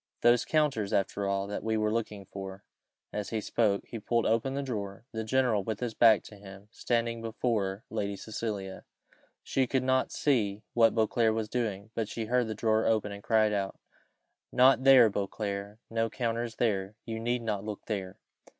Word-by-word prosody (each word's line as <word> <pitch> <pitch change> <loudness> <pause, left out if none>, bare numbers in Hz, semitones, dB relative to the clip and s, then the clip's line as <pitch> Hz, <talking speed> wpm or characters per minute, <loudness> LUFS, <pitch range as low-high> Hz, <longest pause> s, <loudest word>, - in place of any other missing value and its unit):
"Those 120 0 +4
counters, 145 -10 +1
after 100 +1 0
all, 100 0 0
that 100 +1 -5
we 110 0 0
were 110 0 +1
looking 105 -3 -3
for 95 0 -8 0.3
" - - -55
As 105 -1 -3
he 110 - -1
spoke 105 -2 +1
he 115 - -7
pulled 115 +2 0
open 115 +4 +1
the 140 - -1
drawer. 105 -4 -5
The 110 -1 -3
general 120 -3 +2
with 110 0 -3
his 120 -2 -3
back 110 -3 +5
to 105 - -12
him 100 -1 -11
was 105 - -26
standing 115 -1 -1
before 110 -3 -1
Lady 100 -2 -2
Cecilia, 100 -2 -5 0.6
she 130 -1 +1
could 130 +1 0
not 130 0 +1
see 110 -7 0
what 115 -1 +4
Beauclerc 110 0 +2
was 110 -1 -2
doing, 110 -4 -3
but 110 -2 -2
she 115 - -4
heard 125 +1 +1
the 110 - -4
drawer 110 +1 +2
open, 110 -2 +1
and 100 0 -8
cried 110 -1 +3
out. 100 -1 -2 0.7
"Not 130 +1 +5
there, 130 -4 +8
Beauclerc; 100 0 -3
no 115 0 0
counters 115 -1 -2
there 100 -3 0
you 110 -1 -4
need 120 +1 -1
not 105 -3 -2
look 105 -1 -6
there." 95 -4 -4
110 Hz, 185 wpm, -29 LUFS, 100-115 Hz, 0.7 s, there